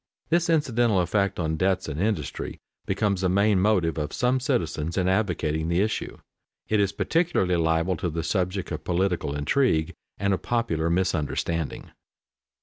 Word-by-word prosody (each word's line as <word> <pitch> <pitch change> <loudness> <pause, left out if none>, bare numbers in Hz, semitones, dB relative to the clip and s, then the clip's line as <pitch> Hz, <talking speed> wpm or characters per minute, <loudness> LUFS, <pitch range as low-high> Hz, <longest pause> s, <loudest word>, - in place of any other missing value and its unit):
This 170 0 +2
incidental 120 - +2
effect 100 +3 0
on 80 -2 -1
debts 95 +2 +1
and 75 +2 -3
industry 100 -9 -2 0.3
becomes 100 -1 0
the 95 - +2
main 100 +1 +3
motive 90 -6 +2
of 75 0 -3
some 125 +1 +1
citizens 85 -8 -1
in 90 -1 +1
advocating 85 -6 0
the 85 +2 +2
issue. 110 +2 -2 0.5
It 110 - +2
is 100 -1 +2
peculiarly 160 - +1
liable 80 +2 +1
to 90 - -2
be 80 - -8
the 80 - -1
subject 90 +2 -1
of - - -4
political 90 -5 0
intrigue 80 - +1 0.2
and 100 0 +1
of 95 - -2
popular 85 -10 0
misunderstanding. 85 -3 -1
95 Hz, 155 wpm, -25 LUFS, 80-105 Hz, 0.5 s, main